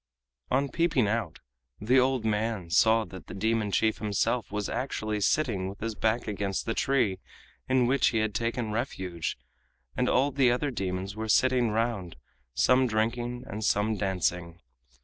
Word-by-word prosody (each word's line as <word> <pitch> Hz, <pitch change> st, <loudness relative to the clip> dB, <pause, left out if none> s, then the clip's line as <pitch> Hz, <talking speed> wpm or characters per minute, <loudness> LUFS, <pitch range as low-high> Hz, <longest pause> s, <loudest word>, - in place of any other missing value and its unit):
On 135 Hz, +2 st, +2 dB
peeping 145 Hz, -5 st, +1 dB
out, 105 Hz, -6 st, -2 dB, 0.4 s
the 125 Hz, +5 st, +3 dB
old 130 Hz, -2 st, +1 dB
man 105 Hz, -5 st, -1 dB
saw 110 Hz, +4 st, +4 dB
that 95 Hz, -2 st, -11 dB
the 90 Hz, -, -8 dB
demon 110 Hz, +1 st, 0 dB
chief 110 Hz, +2 st, +1 dB
himself 105 Hz, +1 st, -1 dB
was 105 Hz, -1 st, -2 dB
actually 110 Hz, -5 st, -3 dB
sitting 100 Hz, -6 st, +1 dB
with 100 Hz, -, -10 dB
his 115 Hz, 0 st, -2 dB
back 110 Hz, +2 st, 0 dB
against 100 Hz, -2 st, -2 dB
the 115 Hz, -, -1 dB
tree 120 Hz, -9 st, +1 dB, 0.5 s
in 130 Hz, -1 st, +3 dB
which 130 Hz, +2 st, +3 dB
he 115 Hz, -, +1 dB
had 110 Hz, -1 st, 0 dB
taken 115 Hz, 0 st, -2 dB
refuge, 95 Hz, -, -3 dB, 0.6 s
and 125 Hz, 0 st, +1 dB
all 135 Hz, +3 st, +3 dB
the 135 Hz, -2 st, +3 dB
other 140 Hz, +4 st, 0 dB
demons 95 Hz, -2 st, -3 dB
were 110 Hz, 0 st, -4 dB
sitting 125 Hz, +1 st, +3 dB
round, 110 Hz, -5 st, -2 dB, 0.4 s
some 130 Hz, +1 st, +4 dB
drinking 120 Hz, +2 st, -1 dB
and 110 Hz, -1 st, -6 dB
some 105 Hz, +2 st, +1 dB
dancing. 90 Hz, -3 st, -2 dB
110 Hz, 160 wpm, -28 LUFS, 100-125 Hz, 0.6 s, saw